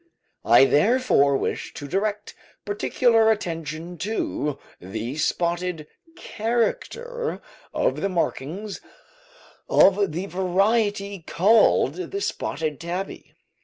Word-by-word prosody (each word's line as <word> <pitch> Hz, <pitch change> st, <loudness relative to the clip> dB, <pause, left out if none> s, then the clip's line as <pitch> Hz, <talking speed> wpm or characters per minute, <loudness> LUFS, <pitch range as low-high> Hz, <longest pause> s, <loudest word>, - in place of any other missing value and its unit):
I 135 Hz, -, +7 dB
therefore 150 Hz, -, +3 dB
wish -, -, -4 dB
to 145 Hz, -, -7 dB
direct 205 Hz, +5 st, -2 dB, 0.3 s
particular 225 Hz, +2 st, +2 dB
attention 165 Hz, -4 st, -3 dB
to 170 Hz, -7 st, -2 dB, 0.2 s
the 110 Hz, +9 st, -5 dB
spotted 170 Hz, 0 st, -1 dB, 0.3 s
character 465 Hz, -, -2 dB, 0.3 s
of -, -, 0 dB
the 195 Hz, -, 0 dB
markings 180 Hz, +3 st, -3 dB, 0.9 s
of 195 Hz, -1 st, +4 dB
the 175 Hz, +5 st, -3 dB
variety 200 Hz, +2 st, 0 dB
called 205 Hz, +7 st, +3 dB, 0.2 s
the 400 Hz, -, -3 dB
"spotted 155 Hz, -, -3 dB
tabby." 180 Hz, +3 st, -6 dB
195 Hz, 90 wpm, -24 LUFS, 165-220 Hz, 0.9 s, I